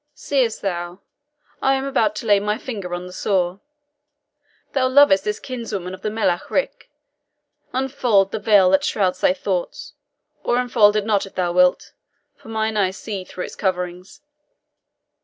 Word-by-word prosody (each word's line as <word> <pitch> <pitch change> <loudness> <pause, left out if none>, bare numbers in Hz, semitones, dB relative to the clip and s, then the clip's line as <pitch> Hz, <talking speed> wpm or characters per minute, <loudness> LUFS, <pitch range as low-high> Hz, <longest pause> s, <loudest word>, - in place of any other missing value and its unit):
Seest 260 -7 -1
thou, 175 -1 -4 0.6
I 270 0 +3
am 265 0 -2
about 225 -6 +1
to 220 - -6
lay 205 -2 +4
my 210 +1 -1
finger 200 -9 -5
on 175 0 -6
the 180 - -10
sore. 185 -1 -1 1.1
Thou 260 -2 +2
lovest 260 -8 +5
this 210 0 -2
kinswoman 225 -8 -5
of 185 - -10
the 215 - -2
Melech 200 -5 -1
Ric. - - -2 0.8
Unfold 250 -7 +1
the - - -3
veil 200 -3 +4
that 190 - +3
shrouds 185 -3 0
thy 180 - +3
thoughts 185 -1 -4 0.5
or 240 - +1
unfold 230 -4 +4
it 210 -1 0
not 205 -3 +1
if - - -17
thou 180 -2 0
wilt, 180 0 +2 0.4
for - - -18
mine 220 -1 -1
eyes 190 -1 0
see 200 -4 -5
through 180 0 -7
its - - -8
coverings." 180 -1 -3
205 Hz, 160 wpm, -21 LUFS, 185-225 Hz, 1.1 s, lovest